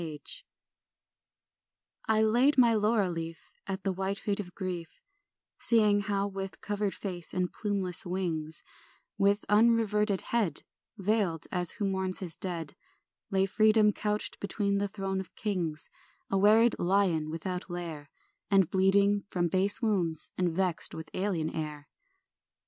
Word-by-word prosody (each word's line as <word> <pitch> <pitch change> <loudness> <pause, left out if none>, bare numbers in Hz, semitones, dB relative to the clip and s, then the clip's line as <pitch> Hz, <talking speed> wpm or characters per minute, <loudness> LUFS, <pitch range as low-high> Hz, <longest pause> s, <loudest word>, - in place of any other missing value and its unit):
1 155 -3 -5 1.9
I 220 0 +3
LAID 245 +7 +3
my 240 -3 +6
laurel 210 -3 +2
leaf 165 -1 -7
At 190 0 -4
the 195 - +1
white 190 +2 -2
feet 200 0 -2
of 180 -3 -7
grief, 180 -4 -5 0.6
Seeing 210 -3 +4
how 200 0 -1
with 195 -1 -6
covered 205 -1 -2
face 180 -4 -5
and 180 -1 -1
plumeless 200 -2 -2
wings, 170 -4 -3 0.6
With 200 +1 +2
unreverted 210 -2 +3
head 205 -11 +2 0.3
Veiled, 195 -5 0
as 180 -1 -1
who 210 - -3
mourns 190 -1 -1
his 175 -4 -1
dead, 170 -6 -4 0.5
Lay 190 0 +2
Freedom 215 +1 +4
couched 210 0 -2
between 200 0 -1
the 205 - 0
thrones 195 -1 -3
of 190 - -8
kings, 175 -8 -3 0.4
A 195 - +2
wearied 220 +3 +5
lion 175 -4 +2
without 180 +4 -4
lair, 165 -5 -6 0.4
And 195 -4 +4
bleeding 200 +2 +3
from 175 -3 0
base 195 +6 +2
wounds, 175 -8 0
and 180 -2 +1
vexed 180 0 +1
with 160 -1 -8
alien 185 -5 -1
air. 150 -2 -5
STR. - - -49
195 Hz, 140 wpm, -30 LUFS, 175-205 Hz, 1.9 s, my